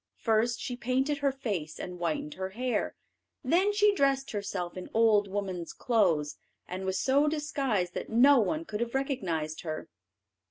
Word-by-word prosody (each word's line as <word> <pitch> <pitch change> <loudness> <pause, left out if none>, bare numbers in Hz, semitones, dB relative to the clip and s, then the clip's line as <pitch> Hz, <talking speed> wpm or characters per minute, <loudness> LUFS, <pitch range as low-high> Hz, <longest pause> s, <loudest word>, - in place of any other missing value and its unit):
First, 230 +1 +1
she 245 - -4
painted 265 +4 0
her 280 -1 +2
face, 200 - -4
and 180 -1 -6
whitened 155 -3 -2
her 190 0 -4
hair; 250 0 -1 0.5
then 350 +10 +3
she 415 0 +4
dressed 275 -5 +1
herself 195 -4 -3
in 185 - -7
old 220 -3 +4
woman's 190 -4 -4
clothes, 170 -11 +1 0.3
and 185 +1 -5
was 190 0 0
so 280 +3 +3
disguised 275 - -1
that - - -5
no 260 +4 +6
one 310 +9 0
could 210 -7 -4
have 235 +2 -2
recognised 175 - -2
her. 155 -2 -5
225 Hz, 160 wpm, -29 LUFS, 185-270 Hz, 0.5 s, no